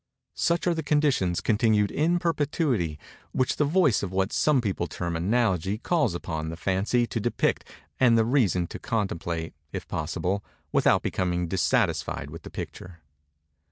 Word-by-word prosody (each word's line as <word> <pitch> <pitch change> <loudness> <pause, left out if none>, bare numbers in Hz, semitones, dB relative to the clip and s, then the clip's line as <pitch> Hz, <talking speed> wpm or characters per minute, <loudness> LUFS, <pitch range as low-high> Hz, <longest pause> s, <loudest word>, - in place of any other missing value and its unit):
Such 170 0 0
are 175 - +3
the 160 - -2
conditions, 145 - +1
continued 105 -2 +2
in 170 +4 +2
perpetuity, 145 - 0 0.4
which 130 - 0
the 150 - +3
voice 150 - +3
of 100 - -4
what 95 +1 0
some 150 -3 +3
people 95 -6 -1
term 85 +1 -4
"analogy" 95 0 +1
calls 155 - +1
upon 80 -2 -4
the 80 - -6
Fancy 100 +7 +1
to 115 - -3
depict 120 +3 0 0.3
and 120 -3 +5
the 110 - +3
Reason 110 - +2
to - - -8
contemplate, 85 -6 -2 0.2
if - - -6
possible, 100 +3 -2 0.3
without - - +3
becoming 90 -1 -1
dissatisfied 95 +2 0
with - - -8
the - - -10
picture. 85 -2 -8
105 Hz, 155 wpm, -26 LUFS, 90-140 Hz, 0.4 s, and